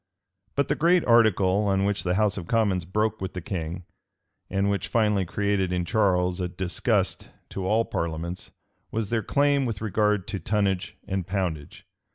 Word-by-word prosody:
But 140 - +1
the - - +2
great 170 +2 +3
article 105 -4 +4
on 95 0 +2
which 100 0 0
the 90 0 0
house 105 0 +2
of 90 -4 -6
commons 100 -7 +1
broke 110 +4 -1
with 95 - -4
the 90 - -4
king, 85 0 -5 0.6
and 100 +1 0
which 100 -1 -1
finally 105 -4 +2
created 95 0 0
in 90 -1 -1
Charles 90 -4 +1
a 90 - 0
disgust 90 0 -1 0.2
to 95 -1 -4
all 110 +3 +2
parliaments, 85 +2 -4 0.4
was 110 -2 -3
their 115 -2 +1
claim 140 +3 +2
with 110 -4 -3
regard 105 -2 +1
to 100 - -3
tonnage 95 0 -1
and 95 -2 -2
poundage. 90 -7 -3
100 Hz, 170 wpm, -26 LUFS, 90-110 Hz, 0.6 s, article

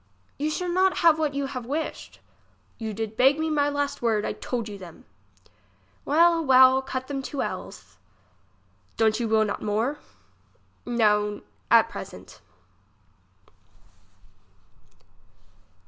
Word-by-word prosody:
You 300 +2 0
shall 360 +4 -3
not 370 +2 +2
have 320 -1 +6
what 300 -3 -1
you 280 0 -1
have 255 -3 -6
wished. 305 +4 -5 0.6
You 220 -1 -4
did 220 +1 -5
beg 270 +5 +4
me 315 0 -1
my 290 -1 +2
last 285 0 -3
word, 220 -3 +1
I - - -2
told 235 -3 -4
you 210 - -7
them. 190 +5 -13 1.0
Well, 335 +2 +4
well, 260 -1 +6
cut 260 -1 -5
them 275 0 -4
two 270 +1 -4
ells. - - -8 1.0
Don't 220 0 +2
you 235 - -1
will 220 0 +3
not 205 - -4
more? 225 +8 -1 0.9
No, 210 -3 +1 0.3
at - - +6
present. - - -10
260 Hz, 125 wpm, -25 LUFS, 220-290 Hz, 1.0 s, have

